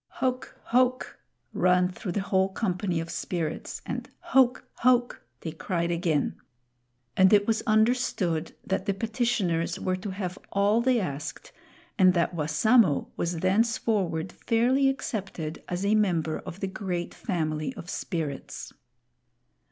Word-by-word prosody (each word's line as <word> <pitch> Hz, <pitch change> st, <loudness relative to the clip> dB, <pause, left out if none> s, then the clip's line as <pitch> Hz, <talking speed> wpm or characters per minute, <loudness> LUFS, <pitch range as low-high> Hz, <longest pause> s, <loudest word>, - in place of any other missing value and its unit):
"Hoke! 255 Hz, -1 st, -2 dB
hoke!" 255 Hz, +1 st, +1 dB, 0.3 s
ran 180 Hz, 0 st, +3 dB
though 185 Hz, -, -6 dB
the 195 Hz, +3 st, -1 dB
whole 190 Hz, -1 st, +2 dB
company 190 Hz, -3 st, -1 dB
of 165 Hz, 0 st, -5 dB
Spirits, 165 Hz, -4 st, -4 dB
and -, -, -4 dB
"Hoke! 265 Hz, -8 st, +3 dB
hoke!" 245 Hz, 0 st, +2 dB, 0.2 s
they 160 Hz, -, -4 dB
cried 170 Hz, +1 st, -2 dB
again. 165 Hz, -4 st, 0 dB, 0.8 s
And 190 Hz, 0 st, +6 dB
it 205 Hz, -1 st, +5 dB
was 225 Hz, 0 st, +1 dB
understood 215 Hz, -7 st, +1 dB
that 190 Hz, +1 st, -2 dB
the 200 Hz, -, +1 dB
petitioners 195 Hz, -6 st, 0 dB
were 185 Hz, -1 st, 0 dB
to 195 Hz, +2 st, -6 dB
have 185 Hz, -1 st, -4 dB
all 205 Hz, +3 st, +3 dB
they 255 Hz, -1 st, +3 dB
asked, 150 Hz, -5 st, -5 dB, 0.5 s
and 185 Hz, -1 st, +6 dB
that 170 Hz, +1 st, +1 dB
Wassamo 165 Hz, -, +3 dB
was 170 Hz, -1 st, -2 dB
thenceforward 195 Hz, -4 st, +1 dB
fairly 255 Hz, +4 st, +2 dB
accepted 195 Hz, -, -4 dB
as 180 Hz, +2 st, -2 dB
a 205 Hz, -, +3 dB
member 175 Hz, -7 st, +1 dB
of 180 Hz, -, -9 dB
the 195 Hz, -, 0 dB
great 185 Hz, -3 st, -4 dB
family 155 Hz, -4 st, -2 dB
of 165 Hz, -, -9 dB
Spirits. 160 Hz, -6 st, -4 dB
190 Hz, 135 wpm, -27 LUFS, 170-225 Hz, 0.8 s, And